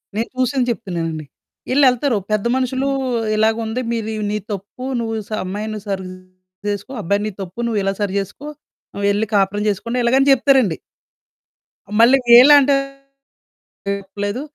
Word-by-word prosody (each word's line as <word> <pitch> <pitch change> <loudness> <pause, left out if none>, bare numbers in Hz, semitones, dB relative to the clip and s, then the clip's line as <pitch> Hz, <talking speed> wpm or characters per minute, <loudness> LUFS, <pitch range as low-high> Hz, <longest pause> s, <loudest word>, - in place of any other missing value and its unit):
నేను 225 +2 -2
చూసింది 255 0 +1
చెప్తున్నానండి. 165 -8 -4 0.5
ఈళ్ళెళ్తారు 260 -3 +3
పెద్ద 215 +1 0
మనుషులు 260 +1 -1 0.5
ఇలాగా 220 +1 +2
ఉంది 230 +3 -3
"మీరు 225 -2 -2 0.2
నీది 210 -1 -3
తప్పు, 200 +6 -8 0.2
నువ్వు 225 -1 -3
స - - -18
అమ్మాయిని 210 +3 -4
సరి 190 -2 -3 0.6
చేసుకో 205 +5 -3
అబ్బాయి 200 +3 0
నీది 210 -2 -6
తప్పు 190 +5 -8
నువ్వు 220 -3 0
ఇలా 195 0 0
సరి 200 -2 -1
చేసుకో. 205 +9 -7 0.5
ఆహ్, 200 - -4
వెళ్లి 205 +2 +1
కాపురం 205 +1 +1
చేసుకోండి" 230 +5 -2
ఇలాగ 235 +2 +3
అని 280 - +3
చెప్తారండి. 260 - +3 1.2
మళ్ళీ 250 +4 +7 0.2
ఈళ్ళేంటారు 275 +1 +6 1.1
చెప్పలేదు. 205 +4 -5
220 Hz, 135 wpm, -19 LUFS, 200-255 Hz, 1.2 s, మళ్ళీ